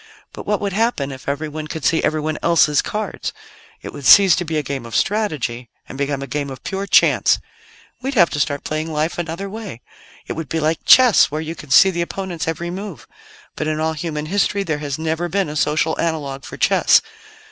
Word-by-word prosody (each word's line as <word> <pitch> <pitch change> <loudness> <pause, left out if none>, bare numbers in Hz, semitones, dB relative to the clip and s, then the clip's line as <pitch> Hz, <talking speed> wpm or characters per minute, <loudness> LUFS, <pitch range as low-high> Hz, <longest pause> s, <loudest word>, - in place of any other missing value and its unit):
But - - -9
what 210 -1 +1
would 200 -2 -2
happen 210 - 0
if 130 +1 -7
everyone 155 +2 -4
could 155 -1 -6
see 165 - +2
everyone 155 0 -1
else's 155 -3 +3
cards? 210 -2 -4 0.5
It - - -7
would 140 - -4
cease 195 -5 +8
to 180 - -1
be 160 -2 -3
a 150 - -1
game 135 -2 -4
of 115 -1 -8
strategy, 140 - -1 0.2
and - - -9
become 140 0 -2
a - - -4
game 140 +1 -3
of 130 - -9
pure 195 0 -4
chance. - - +4 0.6
"We'd 270 +2 -3
have 175 -6 +5
to 145 - -3
start 145 0 -1
playing 155 +1 -3
Life 155 +3 -2
another 170 +3 -4
way. 200 - -8 0.4
It - - -4
would 160 -4 -6
be 165 - -1
like 160 +1 -1
chess, 255 -4 +7
where 150 +2 -3
you 160 +1 -4
can 150 -3 -12
see 190 +8 +6
the 170 -1 -2
opponent's 175 -1 -4
every 170 +1 -3
move. 200 +3 -7 0.5
But 155 - -3
in 155 0 -1
all 160 0 0
human 150 -1 -4
history 200 +3 0
there 155 -5 -2
has 145 -1 -4
never 160 +2 -2
been 195 -2 0
a 150 - -6
social 155 +1 +1
analogue 145 -5 -3
for - - -9
chess. - - +4
160 Hz, 210 wpm, -20 LUFS, 150-185 Hz, 0.6 s, cease